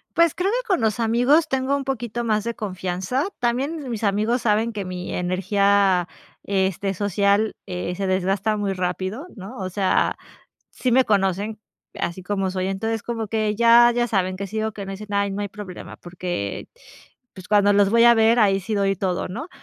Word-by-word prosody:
Pues, 335 -2 +4
creo 365 +3 0
que - - -1
con 380 -6 +1
los 220 +1 0
amigos, 245 +8 +3
tengo 265 +1 0
un 280 - -2
poquito 240 -3 -3
más 215 -2 0
de 235 0 -3
confianza, 190 - -2
también 265 +5 -1
mis 230 -3 -4
amigos 215 +5 +1
saben 220 +1 +2
que 205 -3 -5
mi 180 0 -5
energía, 190 0 +2 0.4
este, 195 0 0
social, 205 +2 +1
eh, 180 -1 -4
se 195 +1 -2
desgasta 195 +3 0
muy 205 -2 -1
rápido, 185 - -3
¿no? 195 -2 -9
O 185 -2 -4
sea, 190 0 +1 0.6
sí 255 - -1
me 255 +2 +5
conocen 200 +1 0 0.4
así 175 +2 -3
como 195 0 -1
soy, 185 0 -2
entonces 220 +3 -2
como 230 -2 -3
que 215 -1 0
ya 235 +2 +6
ya 240 0 +1
saben 185 -3 0
que 200 +1 -5
sí 220 +3 -3
o 220 - -2
que 205 -2 -7
no 195 - -7
dicen, 205 +1 -7
ay, 200 0 +1
no 200 +1 -3
hay 205 - -3
problema 200 -2 -9
porque, 175 - -5 0.7
pues, 185 -2 -11
cuando 205 -1 +4
los 200 -1 +4
voy 230 +1 +4
a 235 0 +8
ver 225 +1 +4
ahí 195 -2 +4
sí 215 +4 -4
doy 195 -1 +1
todo, 180 -1 -2
¿no?, 235 - -6
205 Hz, 195 wpm, -23 LUFS, 190-235 Hz, 0.7 s, a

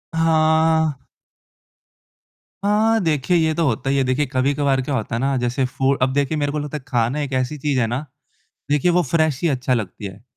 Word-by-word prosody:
हाँ। 160 -2 +2 1.6
हाँ, 220 +2 +3
देखिए 160 +2 +1
ये 160 -1 +2
तो 165 - 0
होता 135 +1 -1
है 140 - +1
ये 135 - +2
देखिए 130 +3 0
कभी-कभार 135 0 0
क्या 135 +1 -3
होता 115 -1 -3
है - - -1
ना 135 0 +1
जैसे 125 +2 0
फू 135 +2 0
अब 130 +1 +2
देखिए 145 +2 0
मेरे 145 -1 -1
को 150 - -2
लगता 150 +1 -4
है 140 - -12
खाना 120 +3 0
एक 140 -2 -4
ऐसी 130 +3 -1
चीज़ 140 -2 -1
है 115 - +1
ना, 125 +6 -3 0.7
देखिए 150 +4 +2
वो 180 +1 +3
फ्रेश 155 -2 0
ही 170 - +2
अच्छा 130 -2 0
लगती 105 -2 -4
है। 95 +2 -10
140 Hz, 205 wpm, -21 LUFS, 130-155 Hz, 1.6 s, हाँ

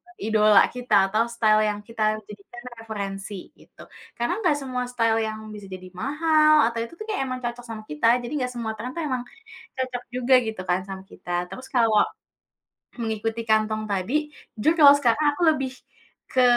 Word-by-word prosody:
idola 215 - +4
kita, 250 0 -1 0.2
atau 225 +3 +2
style 220 -2 +3
yang 205 0 -3
kita 215 -1 0
jadikan 210 +4 -12 0.2
referensi 200 -3 -6
gitu. - - -16 0.3
Karena 240 - -1
nggak 350 -7 +3
semua 260 -3 -3
style 230 -2 +1
yang 215 0 -5
bisa 205 -2 -9
jadi 185 -1 -9
mahal 305 - +3 0.2
atau 230 - -4
itu 230 - -9
tuh 430 - -8
kayak 410 -10 -1
emang 255 0 -4
cocok 240 0 -5
sama 220 -1 -7
kita, 150 +8 0 0.2
jadi 240 - -6
nggak 250 -1 -2
semua 230 -2 -3
trend 250 +3 -6
tuh 335 - -3
emang 255 -4 -2 0.6
cocok 255 -1 -3
juga 250 +1 +3
gitu 220 -4 -5
kan, 180 +1 +2
sama 190 0 -7
kita. 180 - -12 0.2
Terus 225 +8 -9
kalau 230 -4 +4 1.0
mengikuti 225 0 -2
kantong 215 0 +1
tadi, 195 +6 -2 0.5
jujur 310 +10 +3
kalau 285 -2 +10
sekarang 255 +3 +2
aku 290 - -7
lebih 270 -3 -3 0.6
ke 255 - +2
230 Hz, 175 wpm, -24 LUFS, 215-255 Hz, 1.0 s, kalau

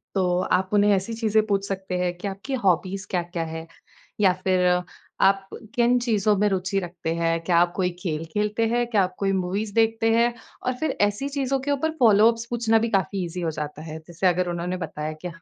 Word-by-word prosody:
तो 180 -1 +2
आप 185 +1 +2
उन्हें 205 0 +4
ऐसी 195 +5 -3
चीज़ें 220 -1 +1
पूछ 200 -1 0
सकते 190 -2 -3
हैं 180 -1 0
कि 200 - -5
आपकी 200 +8 -5
हॉबीज़ 185 +2 +1
क्या-क्या 175 -2 -2
हैं 160 +1 -7 0.5
या 185 -2 +5
फिर 185 -1 +2 0.6
आप 195 0 +3 0.3
किन 245 +1 +4
चीज़ों 215 -3 +2
में 210 +1 +3
रुचि 190 +1 0
रखते 175 -2 -4
हैं? 165 0 +1
क्या 175 -2 +3
आप 175 0 +4
कोई 185 -2 +1
खेल 165 -3 -3
खेलते 210 +2 0
हैं? 240 +1 +1
क्या 210 -5 +3
आप 185 0 -4
कोई 195 -1 +1
मूवीज़ 195 +3 -2
देखते 225 0 +2
हैं? 235 +1 +3 0.3
और 255 - +1
फिर 315 -3 -1
ऐसी 205 +7 +1
चीज़ 275 -2 -2
के 285 - 0
ऊपर 300 +3 0
फ़ॉलो-अप्स 230 0 +5
पूछना 225 -2 +2
भी 230 - 0
काफ़ी 190 +1 -2
ईज़ी 175 +1 -5
हो 165 -2 -1
जाता 150 0 -5
है। 160 - -6
जैसे 175 +2 0
अगर 180 0 +1
उन्होंने 175 +1 -3
बताया 155 +1 -5
कि - - -2
195 Hz, 205 wpm, -24 LUFS, 180-225 Hz, 0.6 s, या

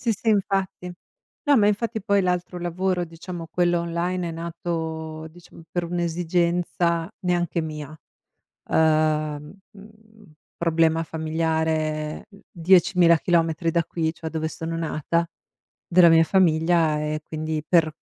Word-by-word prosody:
Sì, 230 -2 +1
sì 225 +2 -4
infatti. 195 -3 -1 0.5
No, 290 -2 +4
ma 205 -2 +4
infatti 220 +1 -1
poi 200 -2 +2
l'altro 180 0 -2
lavoro, 180 +1 -1
diciamo 165 0 -8
quello 175 0 +1
online, 170 +1 -2
è - - -5
nato, 160 -1 -5
diciamo 165 0 -16
per 175 -1 -2
un'esigenza 170 0 0
neanche 175 -2 0
mia. 155 -1 -6 0.7
Uhm, 155 -1 +1 0.2
mhmm, 215 -2 -18 0.2
problema 165 -1 +2
familiare, 160 -1 -2
mhmm, 200 - -17
10.000 175 -1 +4
chilometri 165 0 +1
da 170 -1 +1
qui, 160 -1 -2
cioè 165 -1 -7
dove 160 -1 -2
sono 165 +1 -5
nata, 165 +1 -1 0.6
della 175 -1 +6
mia 165 0 +6
famiglia 165 -3 +2
e 150 0 -2
quindi 155 -1 -4
per 165 -3 +3
170 Hz, 125 wpm, -24 LUFS, 160-180 Hz, 0.7 s, della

